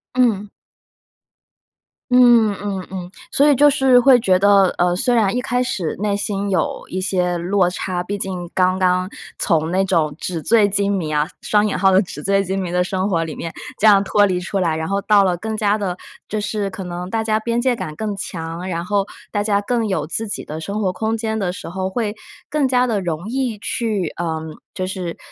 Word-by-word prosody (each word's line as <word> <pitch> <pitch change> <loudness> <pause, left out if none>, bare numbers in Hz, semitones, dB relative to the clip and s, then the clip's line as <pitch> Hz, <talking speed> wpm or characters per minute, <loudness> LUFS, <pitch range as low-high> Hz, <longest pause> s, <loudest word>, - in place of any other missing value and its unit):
嗯。 220 -5 +2 1.6
嗯， 240 -4 +6
嗯， 195 -2 -4
嗯， 185 -2 -7 0.2
所 285 +2 +4
以， 290 - +5
就 290 +3 +6
是 265 -2 +4
会 255 0 +6
觉 185 -4 +3
得， 200 -1 +5
呃， 175 0 +2
虽 245 +7 +1
然 215 -4 +2
一 250 - 0
开 250 -1 0
始 190 -10 -2
内 205 0 0
心 200 0 -2
有 185 -5 -1
一 185 - -4
些 180 -2 0
落 180 +1 +1
差， 180 0 -3
毕 200 +3 -4
竟 185 -3 -4
刚 185 0 +2
刚 185 0 +2 0.3
从 160 -3 +1
那 190 +1 +2
种 165 -6 +1
纸 170 -2 -4
醉 210 +4 +4
金 200 0 +1
迷 165 -5 -2
啊， 150 0 +1
双 210 0 +2
引 205 - -2
号 190 +1 +4
的 190 +1 +5
纸 150 -6 -7
醉 195 0 +2
金 190 +1 -2
迷 180 -2 -4
的 180 0 +1
生 190 +2 -1
活 165 -3 0
里 160 - -6
面， 165 - -5 0.3
这 - - 0
样 205 -2 +7
脱 205 +1 +4
离 185 -2 0
出 190 +2 -3
来， 170 -4 +1
然 160 0 -3
后 200 0 -1
到 205 -1 +4
了 180 -2 +1
更 220 +5 -4
加 210 -1 +2
地 190 -4 -3 0.3
就 215 - -2
是 210 -1 -2
可 190 0 -7
能 180 +1 -5
大 225 +1 -1
家 215 0 +1
边 235 +1 -1
界 250 0 +1
感 155 -9 -5
更 215 -2 -3
强， 170 -2 -6
然 170 -1 -3
后 200 +1 +1 0.3
大 205 - 0
家 205 -1 +2
更 230 +2 -1
有 160 -6 -1
自 220 +6 -3
己 - - -4
的 155 +1 -6
生 200 +6 -4
活 185 -3 0
空 220 +4 -1
间 220 -1 -2
的 190 -4 -1
时 185 - -8
候， 185 +2 -3
会 210 +1 -2 0.3
更 295 -3 +1
加 250 0 +3
地 215 -4 0
容 170 +1 -4
易 250 -3 -1
去 205 -7 -2
呃 165 -2 -2 0.3
就 185 - -3
是 185 -3 -5
195 Hz, 235 characters per minute, -20 LUFS, 180-215 Hz, 1.6 s, 样